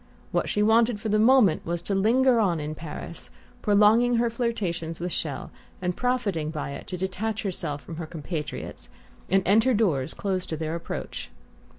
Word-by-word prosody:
What - - 0
she 210 - +1
wanted 225 0 +4
for 220 - -3
the 215 +1 +3
moment 225 -7 +5
was 170 0 -3
to 200 - -2
linger 235 +5 +4
on 180 -7 +2
in 150 +1 -4
Paris, 155 +1 -7 0.3
prolonging 215 +4 +5
her 235 0 +2
flirtation 215 -9 -2
with 175 +1 -3
Chelles, 145 -6 -3 0.3
and 180 -1 -1
profiting 220 -11 0
by 150 -3 -4
it - - -8
to 180 - -4
detach 190 +4 -2
herself 150 -7 -3
from 165 - -8
her 165 -1 -5
compatriots 155 -1 -5 0.4
and 195 +1 +3
enter 225 +5 +4
doors 160 -12 +1
closed 190 -2 -2
to 160 - -2
their 160 0 -3
approach. 170 0 -5
195 Hz, 175 wpm, -26 LUFS, 165-225 Hz, 0.4 s, moment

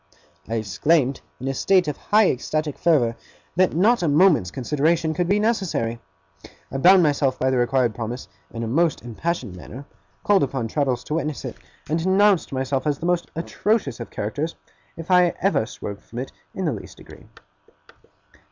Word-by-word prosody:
I 115 - -1
exclaimed, 130 - +1 0.2
in 130 - -5
a 135 - 0
state 185 +5 +3
of 150 - -2
high 210 +5 +3
ecstatic 150 +3 -3
fervour, 135 -9 +3 0.4
that 185 -1 +2
not 215 +7 +3
a 170 - +1
moment's 150 - +4
consideration 155 - 0
could 175 +2 -1
be 205 +1 +3
necessary. 190 - -1 0.7
I 135 - -3
bound 185 +4 +7
myself 140 -3 +1
by 130 0 +1
the 130 - +1
required 120 0 +2
promise, 120 +2 -5 0.2
in 115 0 -5
a - - -2
most 160 +4 +1
impassioned 120 - -3
manner; 125 +9 -10 0.4
called 205 -2 +4
upon 130 -4 -1
Traddles 130 -1 -1
to - - -5
witness 155 -3 -2
it; - - -5 0.3
and 160 +3 0
denounced 190 +2 +3
myself 135 +1 -1
as 145 -2 +1
the 165 - -6
most 175 -1 0
atrocious 170 - -1
of - - -7
characters 145 +10 -3 0.4
if 165 +2 -6
I 180 -1 +5
ever 180 - +1
swerved 100 -4 -7
from 115 - -12
it 130 +2 -4 0.2
in 190 - -2
the 155 - +1
least 105 - -9
degree. - - -15
150 Hz, 175 wpm, -23 LUFS, 125-175 Hz, 0.7 s, bound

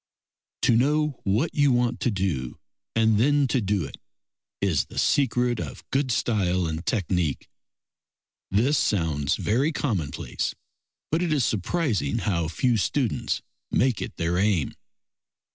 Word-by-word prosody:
To 120 - +5
know 150 +3 +2
what 110 +11 +1
you 145 -2 +3
want 120 -1 +1
to - - +1
do 90 - -2 0.4
and 110 -2 +3
then 145 +3 +3
to 130 - +1
do 100 -4 0
it 70 - -9 0.6
is 80 -10 +1
the - - -13
secret 125 -3 +2
of - - -7
good 135 +1 +1
style 95 -6 +1
and 80 0 -3
technique. 90 - -1 1.0
This 125 +9 +2
sounds 75 -8 +1
very 130 +9 +1
commonplace, 95 - -2 0.6
but 160 +2 +1
it 175 -3 0
is 140 -6 +2
surprising 105 - 0
how 85 -6 0
few 115 +8 +1
students 120 +3 -1 0.3
make 125 -2 +1
it - - -6
their 85 +1 0
aim. 95 -7 +1
110 Hz, 135 wpm, -25 LUFS, 90-130 Hz, 1.0 s, To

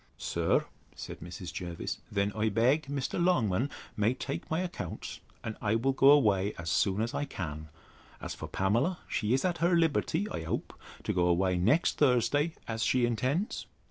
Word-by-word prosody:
Sir, - - +1 0.3
said - - -7
Mrs. 85 0 -7
Jervis, 85 -2 -4
then 100 0 +1
I 110 +1 +1
beg 130 +9 +2
Mr. 140 +5 -1
Longman 130 - +2 0.3
may 110 +4 +2
take - - -5
my 160 +2 0
accounts, 170 - -5 0.2
and 110 - -4
I 105 +1 +1
will 125 +4 +2
go 135 +1 +6
away 105 -8 +4
as 85 0 -3
soon 100 +3 +2
as 115 - -3
I 145 - -1
can. 80 - -6 0.5
As - - -5
for - - -7
Pamela, 115 - +1
she 110 +3 +1
is 135 - 0
at 175 -2 0
her 175 +1 +3
liberty, 165 +3 +1
I - - -3
hope, 80 - -3 0.3
to - - -1
go 90 -1 +2
away 90 +1 +2
next 115 - +2
Thursday, 145 +4 +3
as 115 -1 -3
she 125 0 +3
intends? 130 - -1
115 Hz, 175 wpm, -30 LUFS, 95-145 Hz, 0.5 s, go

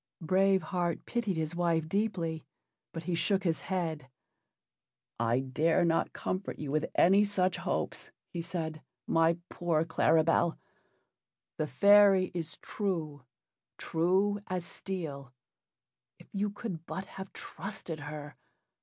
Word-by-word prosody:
Brave 190 +3 +3
Heart 175 -3 -2
pitied 225 -7 -1
his 160 +1 -2
wife 165 -2 +1
deeply, 170 -4 -1 0.5
but 165 - -6
he 175 +2 -2
shook 195 +3 +1
his 165 -3 0
head. 160 -7 -3 1.1
"I 115 +2 +2
dare 155 +6 +2
not 165 -1 +1
comfort 185 +1 -3
you 150 -2 -4
with 155 +1 +1
any 195 +4 +6
such 190 -3 +1
hopes," - - -2 0.2
he 170 - -2
said, 165 -2 -3 0.2
"my 165 +1 +3
poor 165 -2 0
Claribel. 165 +1 +3 1.0
The 155 - 0
fairy 200 +5 +6
is 165 -2 -4
true 160 -9 -3 0.5
true 190 +5 +1
as 180 -2 -2
steel 150 -9 -6 0.8
if - - -17
you 205 +1 0
could 200 -6 -6
but 190 - -4
have 190 0 -9
trusted 185 -5 -6
her! 145 0 -7
170 Hz, 125 wpm, -31 LUFS, 160-190 Hz, 1.1 s, any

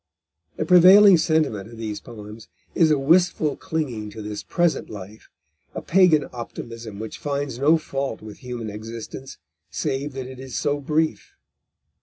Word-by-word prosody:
The 155 - -2
prevailing 185 +3 +8
sentiment 155 - 0
of 115 - -12
these 110 -2 -5
poems 105 0 -11 0.3
is 165 -2 +4
a 150 - +3
wistful 155 0 +2
clinging 140 - -4
to 110 +1 -9
this 105 0 -5
present 175 -2 0
life, 105 +1 -10 0.5
a - - -4
Pagan 170 -6 +4
optimism 115 -2 -8
which 110 +1 -7
finds 140 -3 -3
no 155 +4 +4
fault 135 -5 -4
with 105 -1 -11
human 120 -4 -6
existence 115 +5 -8 0.3
save 135 +2 -3
that 130 -1 -5
it 130 0 -10
is 130 -2 -8
so 145 0 0
brief. 155 +3 -1
135 Hz, 150 wpm, -23 LUFS, 110-155 Hz, 0.5 s, prevailing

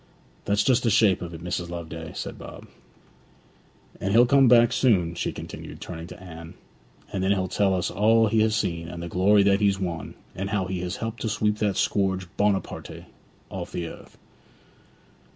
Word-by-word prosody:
'That's 100 +1 +2
just 130 -2 +3
the 120 - +1
shape 105 -3 +4
of 85 -1 -6
it, 80 -1 -9
Mrs. 90 -1 -3
Loveday,' 85 -1 -7
said - - -6
Bob. - - -10 1.3
'And 100 +1 -1
he'll 120 +2 +7
come 135 +1 +5
back 120 0 +6
soon,' 100 -10 +2
she - - -2
continued, - - -9
turning 85 -1 -7
to - - -11
Anne. 85 -2 -10 0.6
'And 95 - -1
then 95 - +1
he'll 95 -2 +1
tell 95 +1 +1
us 90 - -1
all 110 +4 +4
he 110 +1 +2
has 110 0 +2
seen, 85 -6 -2
and 85 0 -7
the - - -4
glory 100 +4 +4
that 100 +1 +3
he's 100 -1 +2
won, 85 -4 -4 0.2
and 95 +2 -4
how 100 -2 0
he 90 0 -3
has 90 +1 -3
helped 115 0 -5
to 110 - -1
sweep 105 0 0
that 105 -2 0
scourge 95 -2 0
Buonaparty 100 -1 -2 0.5
off - - -6
the 85 - -3
earth.' - - -11
95 Hz, 190 wpm, -25 LUFS, 90-105 Hz, 1.3 s, he'll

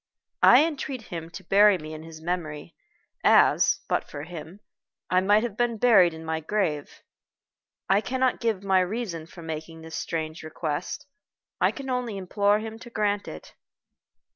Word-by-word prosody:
I 305 - +8
entreat 275 -6 -4
him 165 -4 -7
to 190 +3 -10
bury 200 +2 +5
me 155 -1 -8
in 155 - -8
his 160 0 -11
memory 165 -3 -4 0.5
as, - - +5
but - - -1
for 145 - -7
him, 170 +3 -9 0.5
I 185 0 +4
might 205 +3 +4
have 235 -4 -3
been 240 0 0
buried 205 -7 +6
in 160 0 -10
my 160 0 -1
grave. 160 -4 -2 0.8
I 195 +2 +4
cannot 255 +4 0
give 220 -5 -1
my 190 -1 +3
reason 185 -4 -3
for 170 0 -12
making 160 0 -6
this 160 0 -8
strange 160 -1 -4
request. 155 - -4 0.5
I - - +4
can 275 -2 -7
only 245 -5 -2
implore 200 +2 +2
him 220 +1 -6
to 240 - -11
grant 205 -3 -1
it." 80 - -9
185 Hz, 165 wpm, -26 LUFS, 160-215 Hz, 0.8 s, I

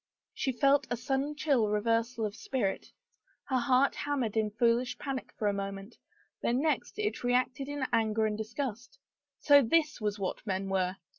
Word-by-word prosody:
She 265 - -1
felt 275 0 +4
a 240 - -1
sudden 270 +4 -1
chill 280 -8 +2
reversal 230 +2 0
of 205 -1 -4
spirit. 230 -6 -2 0.6
Her 260 -2 0
heart 260 +2 +3
hammered 270 -7 -2
in 215 -1 +1
foolish 235 +3 +1
panic 270 -2 -5
for 210 - 0
a 205 - +2
moment, 195 +2 -5 0.5
the - - +1
next 305 +10 0
it 425 -7 -2
reacted 255 +2 +1
in 290 -2 -2
anger 220 -1 +2
and 215 -1 0
disgust. 230 +2 -5 0.4
So 285 -1 +7
this 300 +1 +1
was 210 -1 -1
what 195 -2 -3
men 195 0 -2
were! 185 -1 0
240 Hz, 165 wpm, -30 LUFS, 210-275 Hz, 0.6 s, So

